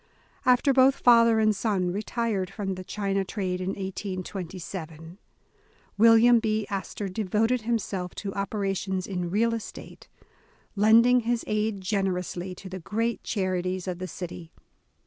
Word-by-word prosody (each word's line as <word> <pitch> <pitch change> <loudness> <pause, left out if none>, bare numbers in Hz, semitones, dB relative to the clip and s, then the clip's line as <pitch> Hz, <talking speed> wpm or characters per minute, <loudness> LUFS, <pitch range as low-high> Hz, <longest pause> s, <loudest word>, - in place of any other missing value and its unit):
After 250 +2 +4
both 265 +1 +5
father 230 -2 +5
and 215 -1 +3
son 190 -3 0
retired 210 -1 -2
from 195 -2 -4
the 185 0 -7
China 195 0 -2
j - - +1
trade 185 -2 -3
in 185 - -3
1827, 185 -3 -6 0.8
William 230 +2 +6
B. 215 -1 -1
Astor 200 +1 -4
devoted 220 +5 0
himself 210 -5 -2
to 195 -2 -5
op 200 0 -3
erations 195 -2 -2
in 180 -3 -3
real 230 +5 +1
estate, 225 -2 -8 0.7
lending 230 +4 +5
his 235 0 -1
aid 215 -1 -1
generously, 185 -2 -2
to 190 - -11
the 185 0 -6
great 225 +6 -2
charities 185 -2 -2
of 180 -1 -3
the 185 - -4
city. 175 -2 -8
195 Hz, 140 wpm, -26 LUFS, 185-225 Hz, 0.8 s, William